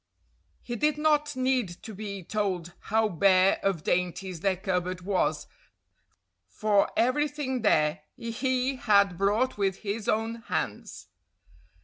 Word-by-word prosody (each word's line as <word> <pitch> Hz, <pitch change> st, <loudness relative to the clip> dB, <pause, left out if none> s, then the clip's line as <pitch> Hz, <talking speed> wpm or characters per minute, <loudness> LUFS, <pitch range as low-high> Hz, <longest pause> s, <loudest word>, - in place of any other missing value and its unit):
He 240 Hz, -, -4 dB
did 300 Hz, +5 st, +1 dB
not 300 Hz, -1 st, +2 dB
need 255 Hz, -3 st, +1 dB, 0.2 s
to 220 Hz, -, -8 dB
be 200 Hz, -2 st, -6 dB
told 185 Hz, -3 st, -2 dB
how 220 Hz, +1 st, +1 dB
bare 185 Hz, +1 st, +4 dB
of 190 Hz, -6 st, -1 dB
dainties 180 Hz, 0 st, -1 dB
their 190 Hz, +1 st, +1 dB
cupboard 180 Hz, -1 st, -2 dB
was, 190 Hz, +1 st, 0 dB, 1.0 s
for 210 Hz, -2 st, +2 dB
everything 260 Hz, +1 st, 0 dB
there 155 Hz, -7 st, +2 dB, 0.2 s
he 255 Hz, +3 st, -1 dB
had 200 Hz, -5 st, +3 dB
brought 210 Hz, +6 st, +1 dB
with 195 Hz, -1 st, -1 dB
his 205 Hz, +1 st, -2 dB
own 225 Hz, +1 st, 0 dB
hands. -, -, -4 dB
205 Hz, 120 wpm, -27 LUFS, 185-250 Hz, 1.0 s, bare